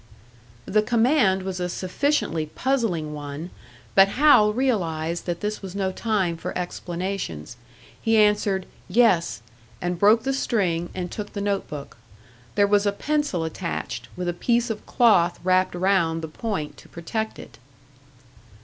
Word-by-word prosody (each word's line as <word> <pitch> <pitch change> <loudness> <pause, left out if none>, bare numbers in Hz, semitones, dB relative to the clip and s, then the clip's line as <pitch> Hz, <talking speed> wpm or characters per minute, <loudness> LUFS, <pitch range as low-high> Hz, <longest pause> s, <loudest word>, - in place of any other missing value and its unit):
The 215 +2 +2
command 225 -4 +3
was 190 -1 -4
a 180 0 -2
sufficiently 185 - -1
puzzling 190 - -1
one, 145 +3 -6 0.4
but 195 - +7
Hal 215 -2 +5
realised 175 -10 -1
that 170 -1 -2
this 210 0 -3
was 190 -1 -8
no 190 -1 0
time 190 -5 -1
for - - -5
explanations. 175 - -4 0.5
He 225 0 +3
answered, 210 -3 +3 0.2
"Yes," 185 - +2 0.4
and 175 -1 -2
broke 215 +3 +5
the 270 - 0
string 185 -10 0
and 180 -2 -4
took 210 -1 -6
the 205 - -4
notebook. 195 -8 -3 0.6
There 205 - +5
was 205 0 +3
a - - +3
pencil 290 - -1
attached, 165 +2 -4
with 180 0 -4
a 175 - 0
piece 235 +6 +1
of 215 - -7
cloth 195 -9 +4
wrapped 185 0 +2
round 175 -3 +1
the - - -3
point 155 -4 -4
to - - -16
protect 220 +6 -4
it. - - -12
190 Hz, 145 wpm, -24 LUFS, 170-220 Hz, 0.6 s, but